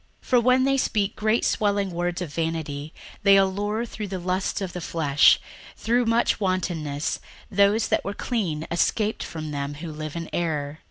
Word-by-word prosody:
61:002:018 - - -20
For 250 -1 +6
when 255 +2 +4
they 275 +1 +2
speak 210 -6 0
great 215 +2 +1
swelling 200 -3 +1
words 175 +1 -2
of 150 -5 -8
vanity, 155 -2 -3 0.3
they 200 -1 +6
allure 205 +4 +1
through 215 -2 -6
the 190 -1 -4
lusts 185 +2 -1
of 190 -3 -4
the 180 - -5
flesh, 150 -4 +4 0.4
through 240 +2 +1
much 230 -1 +2
wantonness, 170 -7 -1 0.3
those 200 +2 +3
that - - +1
were 200 +1 -4
clean 175 -11 -2
escaped 210 +5 +1
from 155 -2 -5
them 140 0 -3
who 160 +2 -7
live 155 0 -6
in 165 -1 -4
error. 155 -3 -2
185 Hz, 175 wpm, -25 LUFS, 160-210 Hz, 0.4 s, For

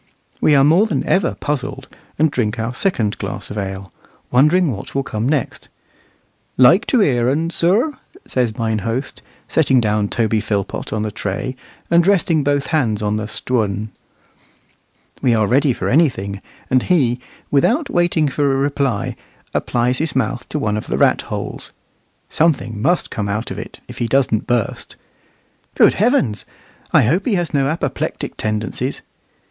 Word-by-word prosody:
We 150 - +5
are 135 - +5
more 170 +9 +5
than 155 -10 -1
ever 190 -3 +1
puzzled, 135 -2 -4 0.3
and 155 0 +3
drink 115 -4 -1
our 115 +2 -2
second 120 - -1
glass - - -5
of 105 - -6
ale, 95 -2 -6 0.4
wondering 150 +6 +4
what 100 +2 -7
will 135 - +1
come 110 0 -2
next. 150 -4 -2 0.9
"Like 165 - +6
to 250 - +3
hear 125 -9 +2
un, 160 +5 0
sir?" 205 - +2 0.3
says 120 -4 -1
mine 110 -2 0
host, 115 +5 -4 0.3
setting 135 -5 +3
down 105 -2 +1
Toby 110 -2 +1
Philpot 100 -2 -3
on 110 -1 -1
the 110 - -3
tray, 105 +5 -4 0.4
and 170 +1 +4
resting 170 -6 +3
both 145 0 +1
hands 110 -9 +1
on 105 0 0
the 110 -1 -3
"Stwun." 110 -3 -2 1.3
We 120 -3 +3
are 110 -1 +2
ready 135 +6 +3
for - - -3
anything; 105 - +1 0.3
and 130 0 +3
he, 130 -8 +2 0.3
without 235 - +2
waiting 175 - +2
for 140 0 +1
a - - +1
reply, 135 -4 -1 0.4
applies 125 +1 0
his 155 -3 -2
mouth 120 -1 -1
to - - -2
one 105 -7 -1
of 105 - -5
the - - -1
ratholes. - - 0 0.6
Something 125 -10 0
must 175 +8 +1
come 105 -2 -3
of 105 +3 -3
it, - - -8
if - - -10
he 120 - 0
doesn't 125 -3 +1
burst. 120 -3 -2 0.8
Good - - +5
heavens! 185 - +1 0.5
I - - +5
hope 165 - +1
he 225 - +2
has 175 -2 -2
no 135 -2 +2
apoplectic 155 +4 -3
tendencies. 105 0 -3
130 Hz, 160 wpm, -19 LUFS, 110-155 Hz, 1.3 s, Like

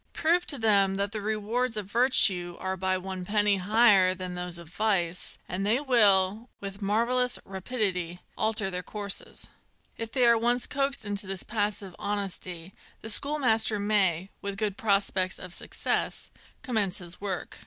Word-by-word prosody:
Prove 345 +2 +1
to 280 - -1
them 200 -4 +3
that 200 +1 -1
the 215 -1 -4
rewards 220 +3 -1
of 210 - -3
virtue 195 -6 +3
are 190 0 -2
by 185 0 0
one 185 0 -6
penny 205 +1 +2
higher 195 -2 +4
than 185 0 -6
those 180 -1 -4
of 170 -1 -11
vice, 180 -2 -1
and 185 +2 -3
they 220 +5 +3
will, 215 -5 +3
with 200 +1 -7
marvellous 240 +5 +2
rapidity, 190 -4 -2 0.2
alter 215 -3 0
their 180 0 -3
courses. 200 +2 -5 0.5
If 225 -1 -4
they 255 -1 +3
are 235 -1 +5
once 240 +2 +2
coaxed 275 -3 -1
into 205 -1 -3
this 195 -1 -4
passive 205 -4 -3
honesty, 190 -3 -2 0.3
the 220 - -5
schoolmaster 230 -5 +2
may, 195 -3 +1
with 200 0 -4
good 205 -2 -1
prospects 195 -3 0
of 180 -1 -9
success, - - -2 0.3
commence 210 -6 0
his 175 -1 -6
work. 195 -3 -4
205 Hz, 155 wpm, -28 LUFS, 185-225 Hz, 0.5 s, are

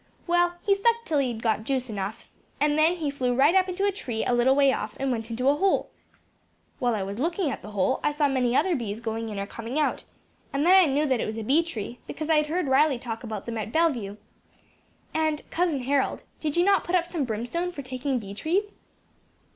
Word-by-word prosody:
Well, 350 0 +2
he 400 - +5
sucked 465 +4 +1
till 305 -7 +1
he 275 - +1
had 230 -2 -5
got 220 -2 +1
juice 260 +1 -1
enough, 205 -1 -5 0.3
then 310 +3 +3
he 310 -5 -2
flew 250 -3 -1
right 280 +6 +5
up 380 -1 +3
into 380 +2 -1
a 405 - +3
tree 245 - -4
a - - +1
little 245 +2 +4
way 275 -1 +4
off, 210 +1 -4
and 270 0 0
went 225 -2 -3
into 245 +3 -1
a 280 - +6
hole. 390 +5 +1 0.9
While 245 -2 +1
I 200 - -2
was 200 +3 -5
looking 335 +1 0
at - - -6
that 210 - -9
hole, 210 +5 0
I 295 - +2
saw 295 0 +1
many 255 -3 +1
other 345 +5 +3
bees 220 -5 -4
going 225 -1 -3
in 210 - -6
or 200 - -2
coming 230 +6 -6
out; 305 - 0 0.5
and 280 +3 0
then 360 - +6
I 370 -6 +6
knew 290 +3 +2
that 260 -4 +1
it - - -1
was 215 +1 -4
a 225 - -3
bee 280 +9 +4
tree, 240 -7 -6
because 315 0 -3
I 315 - +5
had 300 0 +2
heard 335 0 -1
Riley 270 +1 +4
talk 235 -1 -6
about 220 -4 -5
them 230 -1 -4
at 215 +1 -4
Bellevue. 245 -11 0 1.0
And, 315 -1 -1
Cousin 325 -7 0
Harold, 275 +1 0 0.2
did 305 0 -2
you 350 - +4
not 395 -1 +4
put 355 - -1
up 350 -1 +2
some 340 -4 -2
brimstone 245 +10 -2
for 285 -5 -7
taking 260 +1 -2
bee 200 -4 -6
trees?" 375 - -1
275 Hz, 235 wpm, -26 LUFS, 230-330 Hz, 1.0 s, a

